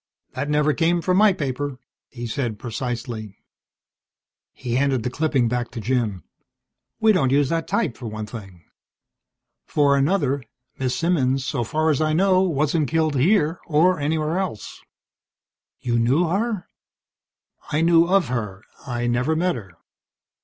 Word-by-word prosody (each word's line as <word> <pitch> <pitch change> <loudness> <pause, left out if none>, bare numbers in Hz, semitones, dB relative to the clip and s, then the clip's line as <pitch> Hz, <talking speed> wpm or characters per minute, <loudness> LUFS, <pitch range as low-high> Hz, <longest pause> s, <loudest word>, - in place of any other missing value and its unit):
"That 145 - -3
never 150 0 +2
came 170 +2 +2
from 180 +2 +1
my 210 0 +6
paper," 140 -4 -3 0.3
he 120 -2 -7
said 120 -2 -3
precisely. 115 -2 -5 1.1
He 120 -2 -5
handed 130 -2 +1
the 125 - -2
clipping 140 -4 +1
back 120 0 -2
to 120 - -7
Jim. 115 -5 -1 0.8
"We 220 0 +5
don't 180 -10 +2
use 140 0 +3
that 165 -1 -1
type, 185 - 0
for 120 - -8
one 110 0 -5
thing. 95 -6 -10 1.0
For 145 -2 +3
another, 140 -2 +1 0.4
Miss 130 -1 -1
Simmons, 135 -6 +1
so 120 - -1
far 155 +7 +1
as 150 - 0
I 155 0 +1
know, 185 +2 +4
wasn't 155 -3 +1
killed 160 -2 +1
here 165 +3 +2
or 170 +3 +3
anywhere 155 +3 0
else." 180 - -5 1.0
"You 120 -1 0
knew 130 +9 +3
her?" 205 +2 -1 1.1
"I 150 - +1
knew 165 0 +5
of 185 -7 +2
her. 105 -5 -4 0.2
I 120 -1 -2
never 125 +6 +1
met 180 +3 +1
her." 100 -8 -9
140 Hz, 145 wpm, -23 LUFS, 120-165 Hz, 1.1 s, my